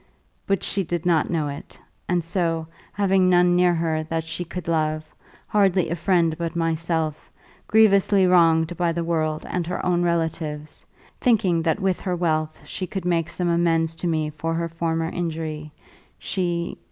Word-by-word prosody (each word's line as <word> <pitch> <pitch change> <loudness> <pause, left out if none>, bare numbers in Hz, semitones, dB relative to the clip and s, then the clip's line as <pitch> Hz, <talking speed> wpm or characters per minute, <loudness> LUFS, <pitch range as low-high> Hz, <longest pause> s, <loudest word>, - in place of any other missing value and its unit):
But 195 -1 0
she 195 - -1
did 175 0 -3
not 165 -4 +2
know 160 -4 0
it; 140 0 -8 0.3
and 175 -1 +1
so, 165 -1 -1 0.3
having 195 -2 +2
none 175 0 +4
near 180 -1 +4
her 160 -1 0
that 160 +1 -3
she 160 +2 -4
could 175 0 -7
love, 155 -1 0 0.4
hardly 195 -5 +2
a - - 0
friend 170 -2 +2
but 170 0 -3
myself, 165 -2 -1 0.4
grievously 200 -2 +4
wronged 165 -2 +4
by 170 -1 +1
the 170 0 -2
world 155 -2 -1
and 175 -2 -2
her 180 - -3
own 175 -1 +2
relatives, 160 -3 -2 0.4
thinking 205 -9 +2
that 165 +4 0
with 190 -2 0
her 180 -2 -1
wealth 155 -3 -1
she 185 - -5
could 190 0 -5
make 170 -2 +1
some 180 - -2
amends 165 -1 +1
to 175 - -2
me 155 -2 0
for 165 +2 -3
her 170 0 -1
former 165 0 -2
injury, 155 -3 -4 0.5
she 175 -2 -2
170 Hz, 165 wpm, -23 LUFS, 160-180 Hz, 0.5 s, none